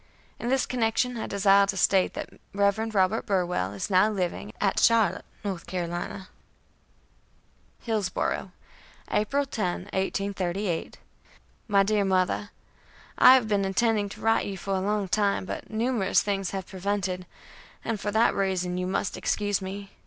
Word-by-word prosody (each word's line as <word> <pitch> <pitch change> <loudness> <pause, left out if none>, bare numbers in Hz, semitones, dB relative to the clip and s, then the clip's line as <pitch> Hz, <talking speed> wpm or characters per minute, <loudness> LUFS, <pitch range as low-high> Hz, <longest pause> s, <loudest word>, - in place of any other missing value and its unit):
In 240 - -3
this 265 0 +2
connection 245 +1 0
I 225 - -4
desire 200 0 +4
to 195 - -2
state 190 0 +3
that - - -5 0.2
Rev. 205 +2 +1
Robert 195 +3 +2
Burwell 180 - 0
is 100 - -4
now 190 +3 +5
living[A] 195 0 -3
at 195 -2 +1
Charlotte, 225 -6 +3 0.2
North 190 -4 -4
Carolina: 180 +2 -4 1.6
"HILLSBORO', 215 -5 -1 0.6
April 275 +7 +1
10, 185 -10 -2
1838. 190 -2 -2 0.7
"MY 200 -2 +4
DEAR 205 0 +1
MOTHER: 190 +1 +1 0.7
I 255 - +9
have 250 -4 +2
been 205 -2 +1
intending 205 +1 +1
to - - -11
write 225 0 +3
to - - -4
you 195 - -5
for 195 +2 -3
a 190 - +1
long 205 +1 0
time, 200 0 +1
but - - -6
numerous 225 -2 +1
things 195 -2 -1
have 190 -2 -4
prevented, 190 -1 -3 0.6
and 225 -2 -2
for 205 - -3
that 220 +3 +3
reason 180 -2 -1
you 180 - -2
must 190 +1 -1
excuse 205 -1 0
me. 195 +1 -7
200 Hz, 150 wpm, -27 LUFS, 185-215 Hz, 1.6 s, I